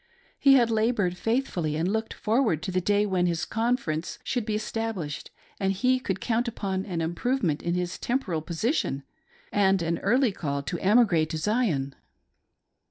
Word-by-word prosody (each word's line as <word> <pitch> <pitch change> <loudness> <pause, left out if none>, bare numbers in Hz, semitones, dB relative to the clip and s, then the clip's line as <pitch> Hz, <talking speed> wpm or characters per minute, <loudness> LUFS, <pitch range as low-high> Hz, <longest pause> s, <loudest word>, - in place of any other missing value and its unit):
He 275 -1 +7
had 235 -3 +4
labored 215 -5 +1
faithfully, 185 - -1
and 160 +3 0
looked 220 +3 -1
forward 215 - +1
to 185 - -3
the 185 0 +1
day 205 +2 +2
when 185 -3 +1
his 170 -2 -1
"conference" 225 -9 -1
should 240 -4 -2
be 215 - 0
established, 215 -8 -3 0.3
and 195 -1 +1
he 255 +6 +2
could 190 -6 -3
count 235 +4 0
upon 195 -4 -3
an 175 -4 -2
improvement 170 - 0
in 170 +1 -1
his 180 -1 -2
temporal 220 -11 -1
position, 165 - -1 0.5
and 195 -3 +3
an 165 0 -1
early 245 +3 +3
call 140 -6 -3
to 170 +4 -3
emigrate 190 -7 +4
to 160 - -3
Zion. 160 - 0
195 Hz, 165 wpm, -27 LUFS, 170-230 Hz, 0.5 s, He